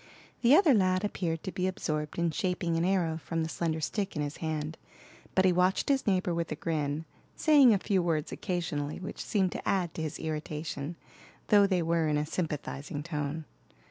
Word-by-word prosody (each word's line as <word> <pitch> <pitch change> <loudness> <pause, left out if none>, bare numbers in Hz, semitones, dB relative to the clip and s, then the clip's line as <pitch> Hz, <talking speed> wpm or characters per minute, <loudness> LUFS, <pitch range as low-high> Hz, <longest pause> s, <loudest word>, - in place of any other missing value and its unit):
The 250 +4 +7
other 320 -5 +6
lad 185 -2 +3
appeared 165 -5 -2
to 190 - -4
be 185 0 -1
absorbed 150 -5 -3
in 170 -1 +1
shaping 180 -1 -1
an 165 - +1
arrow 175 -4 +1
from 165 -1 -1
the 160 - -3
slender 160 -1 -1
stick 195 +5 -2
in 150 - -1
his 145 0 -4
hand, 155 -1 -3 0.6
but 190 - +4
he 185 - +5
watched 180 +6 +2
his 275 -4 +2
neighbor 185 -3 +2
with 170 -1 -2
a - - -1
grin, 155 -1 -2 0.3
saying 290 -6 +6
a 210 - +5
few 195 -1 +1
words 160 -3 -1
occasionally 165 -6 -3
which 185 - -6
seemed 190 -4 +1
to - - -4
add 180 -4 +1
to - - -5
his 155 -2 -3
irritation, 155 0 -4 0.5
though 205 -1 +6
they 185 -3 +1
were 165 -1 +1
in 150 -1 +1
a 150 - 0
sympathizing 150 -3 -4
tone. 150 -1 -3
170 Hz, 195 wpm, -30 LUFS, 155-185 Hz, 0.6 s, The